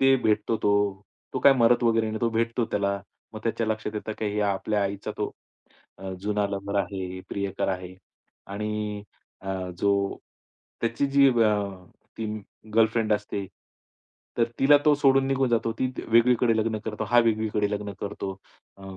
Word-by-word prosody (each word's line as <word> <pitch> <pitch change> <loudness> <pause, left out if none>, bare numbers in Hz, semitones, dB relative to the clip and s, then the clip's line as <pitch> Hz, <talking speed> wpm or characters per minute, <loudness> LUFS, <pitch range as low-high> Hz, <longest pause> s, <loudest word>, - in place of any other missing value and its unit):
ते 135 0 +6
भेटतो 110 +1 +1
तो, 100 -2 +1 0.3
तो - - -1
काय 140 - +8
मरत 120 -1 +4
वगैरे 115 -1 +3
नाही. 110 - -3
तो 115 - +1
भेटतो 115 +1 0
त्याला 100 -1 0 0.4
मग 110 - -6
त्याच्या 115 0 -1
लक्षात 110 0 -2
येतं 110 +1 -4
की 105 -1 -1
आपल्या 100 +1 0
आईचा 100 0 -3
तो - - -1 0.7
अ, 95 0 -6
जुना 105 +1 0
लवर 100 0 -4
आहे, 95 -2 -5
प्रियकर 100 -1 -2
आहे 90 -1 -4 0.6
आणि 105 0 -3 0.4
अ, 95 -1 -4
जो 100 0 +1 0.6
त्याची 115 +4 0
जी 140 0 +5
अ, 115 -4 +3 0.6
ती 115 - -2 0.5
गर्लफ्रेंड 115 -1 +3
असते, 105 -1 -2 0.9
तर 115 - +5
तिला 145 +2 +7
तो 150 -1 +6
सोडून 135 -2 +4
निघून 135 -1 +1
जातो 115 -1 +1
ती 130 - +1 0.2
वेगळीकडे 115 0 +4
लग्न 110 0 0
करतो, 110 0 -3
हा 120 +3 +3
वेगळीकडे 110 -2 +1
लग्न 105 -1 -3
करतो. 100 -1 -4 0.4
अ, 100 - -16
110 Hz, 155 wpm, -26 LUFS, 100-115 Hz, 0.9 s, काय